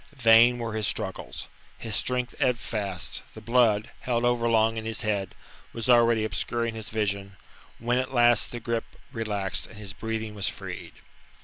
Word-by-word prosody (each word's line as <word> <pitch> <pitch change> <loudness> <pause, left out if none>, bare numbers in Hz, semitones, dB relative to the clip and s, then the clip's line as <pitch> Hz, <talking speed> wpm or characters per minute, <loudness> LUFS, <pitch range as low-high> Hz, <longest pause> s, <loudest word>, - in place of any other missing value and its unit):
Vain 120 0 +6
were 115 -2 -4
his 110 -1 0
struggles. 95 -3 -4 0.3
His 115 -2 -2
strength 125 +2 -1
ebbed 125 -3 +2
fast; 100 -6 -3
the - - -8
blood, 115 -1 +2
held 120 -1 0
overlong 115 -2 +3
in 110 - -3
his 110 -1 -2
head, 100 -3 -2 0.4
was 115 0 -4
already 115 -2 +5
obscuring 115 +1 -2
his 110 -1 -6
vision, 100 -3 -2 0.4
when 120 +2 0
at 130 0 -3
last 120 -3 +4
the 120 - -6
grip 115 0 -2 0.3
relaxed, 105 -5 -1
and 110 - -14
his 100 -2 -5
breathing 110 0 -4
was 100 -2 -1
freed. - - -8
115 Hz, 165 wpm, -27 LUFS, 105-120 Hz, 0.4 s, Vain